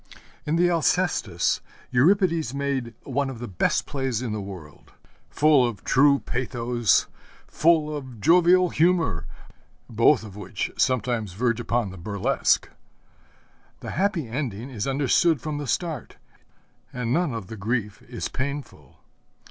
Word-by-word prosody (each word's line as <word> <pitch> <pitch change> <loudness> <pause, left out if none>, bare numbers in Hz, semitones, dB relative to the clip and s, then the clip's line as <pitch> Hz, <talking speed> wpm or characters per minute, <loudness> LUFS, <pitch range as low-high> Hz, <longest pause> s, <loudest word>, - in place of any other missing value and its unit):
In 150 - +1
the 175 +1 +4
Alcestis 165 - +1 0.3
Euripides 165 - +2
made 135 -5 -2
one 140 0 -1
of 130 - -7
the 120 +1 -6
best 90 - 0
plays 135 -5 -2
in 120 - -3
the 105 - -3
world, 90 -7 -11 0.4
full 150 -3 +4
of 120 -5 -3
true 140 +1 +4
pathos, 120 -4 0 0.4
full 155 -2 +2
of 130 -5 -8
jovial 180 - +5
humor, 160 - +1 0.6
both 115 +3 +3
of 105 -3 -10
which 105 0 -4
sometimes 120 -6 0
verge 120 +3 0
upon 120 -3 -1
the 95 - -10
burlesque. 100 +3 +1 1.1
The - - -6
happy 185 - 0
ending 120 -1 -4
is 110 -2 -3
understood 140 +3 +2
from 150 +1 -4
the 145 - -5
start, 160 +1 -3 0.7
and 125 -1 -2
none 170 -1 +1
of 115 -4 -5
the 110 - -8
grief 105 0 -3
is - - -4
painful. 130 - -6
125 Hz, 135 wpm, -25 LUFS, 110-150 Hz, 1.1 s, jovial